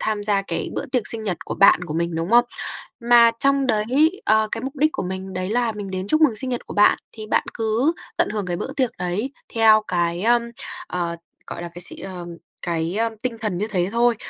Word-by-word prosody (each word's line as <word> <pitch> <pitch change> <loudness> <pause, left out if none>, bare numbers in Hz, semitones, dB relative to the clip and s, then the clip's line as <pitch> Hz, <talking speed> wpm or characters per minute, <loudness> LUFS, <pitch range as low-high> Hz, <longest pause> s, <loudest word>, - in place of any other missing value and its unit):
tham 210 -1 -1
gia 200 -2 +2
cái 165 -3 -3
bữa - - -3
tiệc 250 -5 -1
sinh 220 -1 0
nhật 185 -4 -1
của - - -4
bạn 195 -2 +5
của 155 -2 -5
mình, 170 0 -1
đúng 165 +4 -2
không? 240 +1 +6 0.6
Mà 235 -1 +7
trong 275 -1 +3
đấy, 270 - +2
ờ, 220 - +3
cái 230 - -2
mục 270 +3 -5
đích 305 +3 +3
của - - -3
mình 190 +1 -5
đấy 185 +1 -3
là 235 0 +1
mình 205 -2 -6
đến 185 +1 -3
chúc 310 - +2
mừng 265 -9 +4
sinh 255 +4 -4
nhật 245 - -3
của - - -8
bạn 205 +1 +5 0.2
thì 215 - -7
bạn - - +1
cứ 225 +7 +1 0.2
tận - - +2
hưởng 210 -3 -3
cái 175 -1 -2
bữa 270 - -5
tiệc 260 -4 +1
đấy 200 +10 -2 0.2
theo 220 -1 +6
cái, 175 0 0
ờm, 240 +1 +4 0.4
ờ, 170 -1 -3 0.3
gọi - - -6
là 170 - -5
cái 175 - -5
gì - - -4
ờm, 180 -2 -7 0.3
cái, 170 +2 -2
ơ, 230 0 +1
tinh 245 -3 -2
thần 210 -5 -2
như 210 - -1
thế 185 -4 0
thôi. 235 -1 +3
215 Hz, 240 wpm, -22 LUFS, 180-240 Hz, 0.6 s, Mà